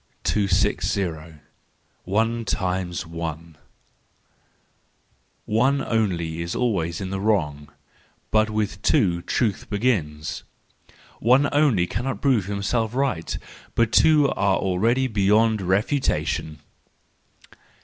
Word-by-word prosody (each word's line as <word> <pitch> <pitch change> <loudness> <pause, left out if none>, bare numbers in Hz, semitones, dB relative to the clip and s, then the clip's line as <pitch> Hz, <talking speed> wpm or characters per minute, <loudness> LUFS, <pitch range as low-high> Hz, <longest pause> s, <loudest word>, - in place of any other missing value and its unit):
260. 95 -5 0 0.7
One 115 +4 0
times 90 -3 -2
One 85 0 -6 1.9
.—One 130 +6 +2
only 85 -8 -1
is 85 +1 -4
always 90 -9 -1
in 95 -1 -4
the 95 - -2
wrong, 75 -9 -1 0.6
but 110 0 +3
with 105 -2 -2
two 90 - +2
truth 105 +2 -1
begins.—One 105 - -2
only 140 -12 +3
cannot 120 +4 -3
prove 125 -8 +2
himself 110 +3 -1
right; 130 -12 -1 0.4
but 115 -1 +2
two 150 +1 +5
are 100 -1 +1
already 110 +8 +1
beyond 110 -1 +2
refutation. 95 - -1
100 Hz, 90 wpm, -23 LUFS, 85-115 Hz, 1.9 s, two